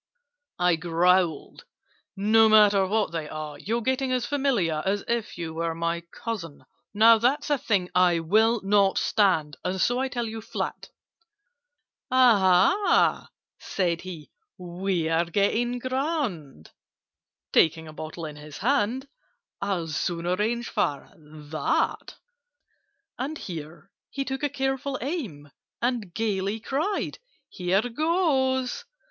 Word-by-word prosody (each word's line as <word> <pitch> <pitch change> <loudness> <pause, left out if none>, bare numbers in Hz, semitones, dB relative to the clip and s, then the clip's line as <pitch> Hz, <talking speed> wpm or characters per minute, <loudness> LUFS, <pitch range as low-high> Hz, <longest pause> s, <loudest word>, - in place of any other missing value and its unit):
I 180 -2 +2
growled 175 -1 +1 0.5
"No 220 +2 +5
matter 205 -3 +5
what 210 -2 0
they 160 -3 -4
are! 155 -1 -6
You're 230 +3 -2
getting 260 +1 0
as 250 -2 0
familiar 240 - 0
As 200 +1 -1
if 235 -2 -2
you 165 -2 -5
were 165 0 -2
my 170 +1 -2
cousin! 190 -11 -6 0.3
"Now 225 +2 +6
that's 280 +6 +1
a 290 - +3
thing 190 -7 0
I 180 -1 +4
will 220 +7 +2
not 195 0 +3
stand, 165 -8 +1
And 185 +1 -2
so 245 +7 +2
I 265 - 0
tell 240 -2 -3
you 225 0 -6
flat." 220 -3 -5 1.2
"Aha," 230 - +4 0.3
said 175 -3 -1
he, 175 -4 -9 0.3
"we're 175 -2 -1
getting 215 +7 0
grand!" 255 - -3 0.8
(Taking 160 0 +3
a 155 - -10
bottle 155 +2 -7
in 150 -1 -8
his 150 0 -10
hand) 255 +3 0 0.5
"I'll 195 -4 -1
soon 170 +2 -3
arrange 215 +7 -1
for 140 -1 -2
that!" 155 0 -3 1.0
And 285 +5 -3
here 165 - -8 0.2
he 275 -1 -4
took 265 0 -4
a 290 - 0
careful 270 0 -2
aim, 225 - -5 0.3
And 235 -6 -1
gaily 205 +1 -1
cried 300 - -2 0.3
"Here 190 +5 0
goes!" 270 - 0
200 Hz, 125 wpm, -26 LUFS, 170-245 Hz, 1.2 s, Now